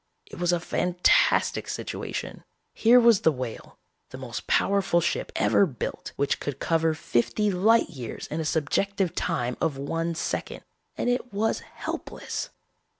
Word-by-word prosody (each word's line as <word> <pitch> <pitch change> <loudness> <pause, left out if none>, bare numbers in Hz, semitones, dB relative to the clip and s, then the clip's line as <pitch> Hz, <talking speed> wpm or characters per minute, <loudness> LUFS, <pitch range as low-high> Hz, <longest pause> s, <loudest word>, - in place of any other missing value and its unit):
"It - - -11
was 175 0 +2
a 175 - +2
fantastic 180 +1 +2
situation. - - -5 0.3
Here 240 +2 +6
was 235 -4 +5
the 160 - +4
Whale, 125 -5 -7 0.3
the - - -9
most - - -7
powerful 195 -3 +2
ship 170 - -1
ever 200 - +4
built, 130 -7 -5
which 140 0 0
could 145 -3 -4
cover 165 -1 +1
fifty 180 - 0
light 215 +5 +4
years 125 -8 -7
in 155 - -4
a 160 - -2
subjective 180 +5 0
time 125 0 -1
of 145 -4 0
one 165 +4 -2
second, 160 - -3 0.3
and - - -1
it 245 0 0
was 210 +3 0
helpless. - - -6
170 Hz, 150 wpm, -26 LUFS, 145-200 Hz, 0.3 s, Here